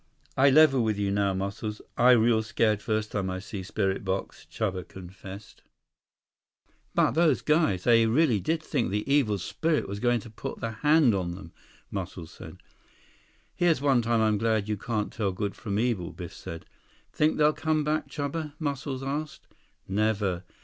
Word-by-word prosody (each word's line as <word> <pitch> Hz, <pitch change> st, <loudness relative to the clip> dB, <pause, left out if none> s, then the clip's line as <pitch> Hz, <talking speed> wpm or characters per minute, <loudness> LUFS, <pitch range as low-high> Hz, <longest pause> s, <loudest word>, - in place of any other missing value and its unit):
"I 135 Hz, +2 st, +5 dB
level 135 Hz, -3 st, +5 dB
with 110 Hz, -2 st, 0 dB
you 100 Hz, -1 st, 0 dB
now, 100 Hz, -1 st, +1 dB
Muscles. 100 Hz, +3 st, -4 dB, 0.2 s
I 125 Hz, +1 st, +6 dB
real 115 Hz, -1 st, +4 dB
scared 110 Hz, -1 st, +1 dB
first 110 Hz, 0 st, -2 dB
time 95 Hz, -3 st, -2 dB
I 95 Hz, -, -3 dB
see 100 Hz, +1 st, -6 dB
spirit 95 Hz, +1 st, -2 dB
box," 95 Hz, 0 st, -4 dB
Chuba 95 Hz, -4 st, -3 dB
confessed. 95 Hz, +2 st, -11 dB, 1.3 s
"But -, -, +4 dB
those 160 Hz, -4 st, +2 dB
guys! 150 Hz, -, +2 dB
They 115 Hz, -1 st, +5 dB
really 125 Hz, -2 st, +3 dB
did 160 Hz, -, -1 dB
think 130 Hz, -, -1 dB
the 105 Hz, +4 st, -2 dB
Evil 135 Hz, -7 st, +2 dB
Spirit 155 Hz, -, -1 dB
was 100 Hz, +1 st, -5 dB
going 120 Hz, +1 st, +2 dB
to 115 Hz, -, -12 dB
put 110 Hz, -, -6 dB
the 115 Hz, -, -3 dB
hand 150 Hz, +2 st, +4 dB
on 90 Hz, -3 st, -2 dB
them," 90 Hz, -3 st, -11 dB, 0.4 s
Muscles 80 Hz, -2 st, -6 dB
said. -, -, -11 dB, 1.0 s
"Here's 170 Hz, -5 st, +2 dB
one 135 Hz, -3 st, +3 dB
time 115 Hz, 0 st, +1 dB
I'm 110 Hz, -2 st, +2 dB
glad 110 Hz, -2 st, +1 dB
you 105 Hz, -, 0 dB
can't 105 Hz, 0 st, -3 dB
tell 105 Hz, -4 st, -1 dB
good 100 Hz, +2 st, -3 dB
from 100 Hz, -3 st, -3 dB
evil," 110 Hz, -7 st, 0 dB
Biff 85 Hz, -1 st, -8 dB
said. 85 Hz, -, -8 dB, 0.5 s
"Think 155 Hz, +1 st, +2 dB
they'll 150 Hz, 0 st, +4 dB
come 155 Hz, -1 st, 0 dB
back, 155 Hz, +1 st, -1 dB
Chuba?" 150 Hz, +1 st, -4 dB
Muscles 140 Hz, -3 st, -3 dB
asked. 145 Hz, +3 st, -4 dB, 0.4 s
"Never. 100 Hz, -3 st, 0 dB
110 Hz, 170 wpm, -27 LUFS, 100-140 Hz, 1.3 s, I